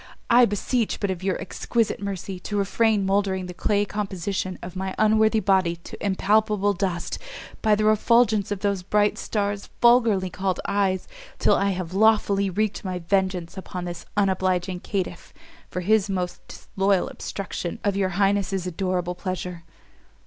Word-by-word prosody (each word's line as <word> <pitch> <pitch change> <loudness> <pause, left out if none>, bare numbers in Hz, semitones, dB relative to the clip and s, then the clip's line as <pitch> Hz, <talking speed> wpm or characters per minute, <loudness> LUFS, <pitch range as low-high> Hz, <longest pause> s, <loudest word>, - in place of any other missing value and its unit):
I 245 +1 +7
beseech 225 +2 -1
but 200 -2 0
of 185 -2 -5
your 190 -1 -1
exquisite 230 -3 -1
mercy 195 -1 -4
to 205 +3 -4
refrain 205 +1 +2
mouldering 195 -1 +1
the 180 - -7
clay 205 +3 +1
composition 190 -2 -3
of 180 +1 -7
my 190 0 -3
unworthy 220 +1 +4
body 190 -4 +2
to 170 - -11
impalpable 205 +1 +2
dust, 180 -2 -2 0.4
by 215 -2 +4
the 215 +1 0
refulgence 215 -1 +3
of 205 -2 -3
those 200 -2 0
bright 205 +3 +1
stars 205 -1 -2
vulgarly 230 -6 +4
called 185 0 -2
eyes, 195 -2 0 0.3
till - - +3
I 200 - +2
have 180 -2 -3
lawfully 200 -1 +3
wreaked 210 +2 -1
my 185 -2 -3
vengeance 185 0 -1
upon 180 -1 -6
this 175 -1 -7
unobliging 185 -2 +1
caitiff, 185 -3 -4 0.3
for 180 - -3
his 205 +2 +2
most 180 -2 -3
disloyal 195 -1 0
obstruction 185 -3 -5
of 205 -1 +1
your 195 -1 +1
highness's 195 -2 +1
adorable 180 0 -1
pleasure." 180 -1 -5
195 Hz, 150 wpm, -24 LUFS, 185-205 Hz, 0.4 s, I